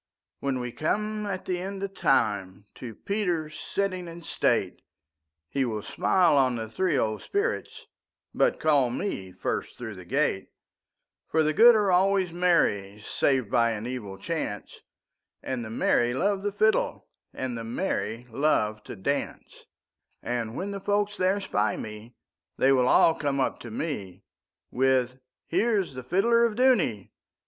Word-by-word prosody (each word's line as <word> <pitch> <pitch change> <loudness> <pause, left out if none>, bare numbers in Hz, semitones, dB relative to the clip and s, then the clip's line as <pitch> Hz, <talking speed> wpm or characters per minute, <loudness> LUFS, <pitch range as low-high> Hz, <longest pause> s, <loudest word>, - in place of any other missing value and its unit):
When 135 -2 -1
we 125 -1 -4
come 210 - -2
at 190 -2 -4
the 180 -1 -2
end 195 +1 -5
of 195 -1 -4
time, 100 - 0
To 115 -4 -9
Peter 180 -7 -2
sitting 185 +3 -3
in 170 0 -9
state, - - 0 0.7
He 135 +9 -1
will 110 -4 -3
smile 175 -6 +3
on 130 -2 +2
the 110 -1 -4
three 165 +6 0
old 110 -3 -1
spirits, 415 +4 -2 0.5
But - - +2
call 145 -5 +3
me 120 - -4
first - - -4
through 115 -3 -6
the 90 -2 -11
gate; - - 0 0.8
For 160 0 +2
the 155 0 +1
good 235 +8 +8
are 205 -3 +2
always 190 0 +3
the 170 - -10
merry, 105 - +2
Save 130 +2 0
by 115 -2 +3
an 110 +1 -5
evil 115 -6 -5
chance, 105 - -5 0.6
And 130 -2 -3
the 110 - -7
merry 120 +2 +1
love 195 +6 +1
the 205 - -1
fiddleAnd 215 +2 +1 0.5
the 115 - -5
merry 115 - -3
love 110 -6 +1
to - - -7
dance:And 120 0 -5
when 200 +2 -3
the 200 - -4
folk 205 +1 0
there 185 +2 +2
spy 110 - 0
me, 110 +3 -8 0.4
They 135 - +4
will 125 -2 +3
all 165 - +5
come 140 -3 -2
up 130 - 0
to 120 - -9
me, 110 - -5 0.5
With 130 0 +1 0.3
'Here 215 +6 +1
is 185 -8 -2
the 130 - -6
fiddler 205 - +3
of 230 -2 +1
Dooney! 210 - +2
140 Hz, 155 wpm, -27 LUFS, 115-195 Hz, 0.8 s, good